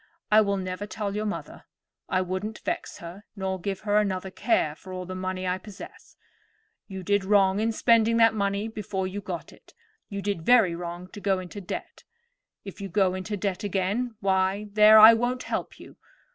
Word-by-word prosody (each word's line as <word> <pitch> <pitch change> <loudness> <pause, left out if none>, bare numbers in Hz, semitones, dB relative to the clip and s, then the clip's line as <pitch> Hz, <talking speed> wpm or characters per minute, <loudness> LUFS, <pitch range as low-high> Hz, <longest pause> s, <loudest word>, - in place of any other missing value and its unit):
I 215 +1 +7
will 200 -1 0
never 185 +2 -4
tell 205 -2 -4
your 215 +1 -2
mother. 205 - -6 0.4
I 185 - +1
wouldn't 185 +4 -4
vex - - -3
her 175 +4 -10
nor 190 -2 -3
give 195 +1 -3
her 210 -1 +1
another 190 -2 -2
care 205 -8 +1
for 185 +4 -13
all 185 0 -5
the 185 - -6
money 185 0 -4
I 180 +1 -1
possess. 200 0 -12 0.7
You 190 -2 -7
did 205 +1 +1
wrong 195 0 +3
in 225 +1 +1
spending 230 0 +3
that 225 -1 +5
money 200 0 -1
before 205 -3 -4
you 195 +2 -5
got 180 -3 -6
it; - - -21 0.3
you 200 -2 -5
did 200 -4 -2
very 220 -2 +4
wrong 175 +1 -6
to 205 - -10
go 195 -1 +1
into 185 +2 -7
debt. 180 - -7 0.6
If 195 +1 -9
you 195 - -5
go 185 0 +2
in 185 - -4
debt 200 -1 -3
again, 205 +5 -1
why, 190 +1 0
there, 215 +1 +7
I 220 +1 +10
won't 245 +2 -1
help - - -4
you. - - -14
200 Hz, 190 wpm, -26 LUFS, 185-210 Hz, 0.7 s, I